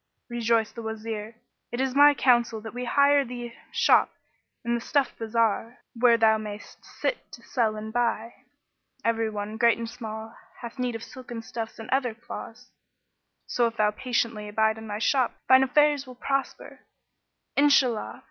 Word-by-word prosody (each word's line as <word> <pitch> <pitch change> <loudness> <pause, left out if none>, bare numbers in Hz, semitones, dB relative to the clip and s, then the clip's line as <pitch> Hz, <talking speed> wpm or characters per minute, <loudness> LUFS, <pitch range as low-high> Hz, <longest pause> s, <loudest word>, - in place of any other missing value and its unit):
Rejoined 230 -1 +2
the 230 - -7
Wazir 220 0 -5 0.4
"It 240 - -4
is 265 -1 0
my 290 +1 +7
counsel 240 -4 +3
that 220 0 -8
we 250 +1 -4
hire 280 +2 +4
thee 240 -1 -6
a 235 - -18
shop - - +4 0.6
in 235 - 0
the 235 - -1
stuff 280 +2 0
bazar, 225 +1 0 0.2
where 235 0 +4
thou 220 -1 +4
mayst 210 0 -9
sit - - -4
to - - -11
sell 225 -5 0
and 215 +1 -7
buy. 235 -1 0 0.7
Every 225 -1 +1
one, 210 +1 -5
great 235 0 +4
and 230 0 -4
small, 225 -1 -7 0.3
hath 235 +2 -8
need 250 -2 -1
of 225 - -6
silken 240 -3 -8
stuffs 225 0 -6
and 225 - -8
other 255 -4 +1
cloths; 240 +1 -10 0.7
so 240 -1 +1
if 230 0 -7
thou 210 -1 +3
patiently 230 -2 -2
abide 220 +1 +1
in 220 - -9
thy 205 0 -4
shop, 250 +2 +1
thine 260 0 +7
affairs 290 +1 +3
will 255 - -10
prosper, 275 +2 -3 0.8
Inshallah! 275 -6 +3
235 Hz, 165 wpm, -26 LUFS, 220-250 Hz, 0.8 s, my